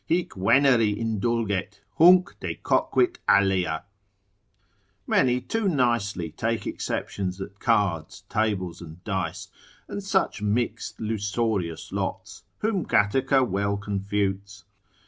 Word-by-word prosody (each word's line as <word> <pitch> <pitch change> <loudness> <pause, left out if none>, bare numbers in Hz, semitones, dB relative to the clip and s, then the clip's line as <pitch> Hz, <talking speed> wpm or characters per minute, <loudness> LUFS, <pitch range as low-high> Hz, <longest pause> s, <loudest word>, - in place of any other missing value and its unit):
Hic 175 +1 0
Veneri 115 +1 +3
indulget, 110 -3 -1 0.2
hunc 180 +3 +6
decoquit 360 -1 0
alea—many 100 +4 -1
too 210 - -1
nicely 115 - 0
take 110 +5 -2
exceptions 95 -1 -3
at 100 +1 -8
cards, 95 -9 0
tables, 100 -6 -1
and 85 +1 -11
dice, 95 -3 -3 0.4
and 200 - -5
such 190 - 0
mixed 110 +2 -2
lusorious 105 -5 -2
lots, - - -4 0.2
whom 210 -5 0
Gataker 130 +5 +2
well 100 +1 -1
confutes. 100 0 -3
100 Hz, 95 wpm, -25 LUFS, 95-120 Hz, 0.4 s, hunc